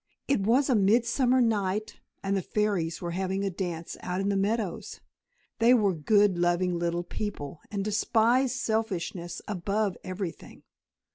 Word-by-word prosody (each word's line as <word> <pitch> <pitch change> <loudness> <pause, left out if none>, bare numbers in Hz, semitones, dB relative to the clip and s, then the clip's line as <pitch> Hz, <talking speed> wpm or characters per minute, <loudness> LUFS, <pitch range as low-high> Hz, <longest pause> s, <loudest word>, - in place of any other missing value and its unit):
It 275 -4 +2
was 245 +7 +3
a 265 - +3
midsummer 235 +5 +3
night, 210 -2 0 0.2
and 195 0 0
the 195 - 0
fairies 185 -5 -1
were 170 - -2
having 190 +2 -2
a 195 - -1
dance 175 -3 -4
out 180 +1 -3
in 195 +1 0
the 200 - +1
meadows. 205 -1 -2 0.6
They 235 +2 +6
were 205 -5 +3
good, 195 +3 +3
loving 175 0 +1
little 170 0 -1
people, 175 -5 -5
and 200 -1 -3
despised 235 +4 +2
selfishness 195 -7 -2
above 200 +1 -1
everything. 185 -2 -6
200 Hz, 145 wpm, -28 LUFS, 180-220 Hz, 0.6 s, They